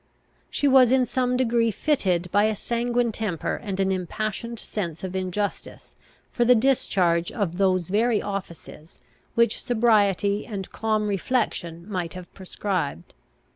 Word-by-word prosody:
She 290 - 0
was 260 -3 +6
in 260 -1 +4
some 250 +1 0
degree 235 -2 +2
fitted 185 - 0
by 205 +1 +4
a 215 0 +1
sanguine 240 +2 0
temper, 205 -7 -2
and 195 -3 -5
an 195 0 +2
impassioned 215 +5 -3
sense 175 -7 -5
of 185 0 -5
injustice, 190 +2 -4 0.4
for 240 - +1
the 245 +1 +6
discharge 185 -9 +2
of 190 -6 -3
those 185 -3 +2
very 220 +3 +2
offices 180 -5 -7 0.4
which 235 0 +2
sobriety 210 -4 +2
and 200 -5 -6
calm 215 -1 0
reflection 195 -5 -2
might 180 -5 -4
have 180 -1 -10
prescribed. 185 - -4
205 Hz, 135 wpm, -25 LUFS, 185-235 Hz, 0.4 s, was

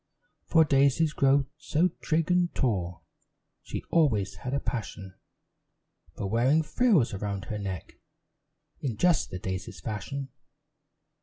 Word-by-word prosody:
For 160 -1 +5
daisies 140 +2 +3
grow 140 0 +3
so 155 +5 +1
trig 165 +2 +1
and 180 -1 +3
tall! 90 -8 -1 0.6
She - - -6
always 110 - +2
had 130 - -5
a 140 - 0
passion 100 -7 -5 1.0
For - - -4
wearing 125 +10 +3
frills 160 - +2
around 100 0 -4
her 110 -3 -4
neck, 95 -3 -6 0.8
In 120 -7 -3
just 175 +5 +3
the 95 - -5
daisies' 95 +1 -5
fashion. 135 +6 -5
135 Hz, 125 wpm, -28 LUFS, 100-155 Hz, 1.0 s, For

